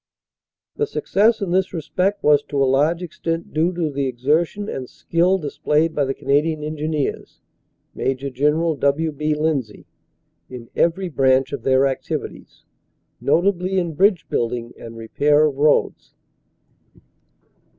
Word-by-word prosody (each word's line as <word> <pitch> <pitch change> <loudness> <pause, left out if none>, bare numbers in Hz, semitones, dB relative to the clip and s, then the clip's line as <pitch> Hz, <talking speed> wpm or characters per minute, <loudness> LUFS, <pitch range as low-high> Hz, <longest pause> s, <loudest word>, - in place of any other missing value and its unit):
The 440 - 0
success 220 - +1
in 190 -3 -2
this 190 +1 +1
respect 180 +5 -1
was 150 -1 +5
to 145 - -5
a 135 - +4
large 150 +7 +2
extent 165 -1 -4
due 160 +3 +2
to 170 -3 -2
the 140 -1 -1
exertion 155 - 0
and 130 -9 -5
skill 175 +3 +1
displayed 155 0 0
by 145 -2 +1
the 135 - -2
Canadian 150 +3 0
Engineers 155 -1 -3 0.5
(Major 135 +1 -2
General 150 +5 +1
W. 140 +4 +1
B. 150 +1 -1
Lindsay) 150 -8 -2 0.6
in 120 -2 -10
every 175 +3 +1
branch 135 -3 +2
of 140 - -4
their 130 +2 +3
activities, 135 -1 -5 0.5
notably 185 +1 +1
in 175 -3 -1
bridge 190 +2 +2
building 120 0 -2
and 115 0 -10
repair 145 +7 +2
of 145 -3 -1
roads." 150 +1 +1
150 Hz, 135 wpm, -21 LUFS, 135-170 Hz, 0.6 s, was